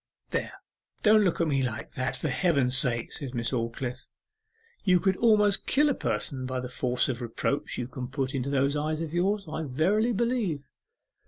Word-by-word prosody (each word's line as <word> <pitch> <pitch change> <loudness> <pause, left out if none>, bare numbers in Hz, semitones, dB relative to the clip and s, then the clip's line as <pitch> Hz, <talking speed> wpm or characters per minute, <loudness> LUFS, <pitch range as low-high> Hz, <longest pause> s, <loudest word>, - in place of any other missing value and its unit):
'There, - - -2 0.5
don't 215 0 +6
look 180 -4 +1
at 170 - +2
me 135 -3 +1
like 110 -3 -4
that, 130 0 -2
for - - -3
Heaven's 140 -4 +2
sake!' 120 -4 +2
said 135 -4 -6
Miss 120 +1 -2
Aldclyffe. 120 +1 -3 0.8
'You 180 -2 +4
could 190 +1 +2
almost 210 -3 +3
kill 295 +2 +4
a - - +2
person 130 - -1
by 130 0 -2
the 125 0 -5
force 125 0 0
of 125 -2 -3
reproach 120 +4 -2
you 120 - -3
can 125 0 -6
put 135 0 -3
into 135 0 -2
those 140 +1 +1
eyes 155 +1 -1
of 160 -1 -4
yours, 195 +3 +1
I 155 +1 -4
verily 175 - +1
believe. 225 - 0
140 Hz, 185 wpm, -28 LUFS, 125-190 Hz, 0.8 s, don't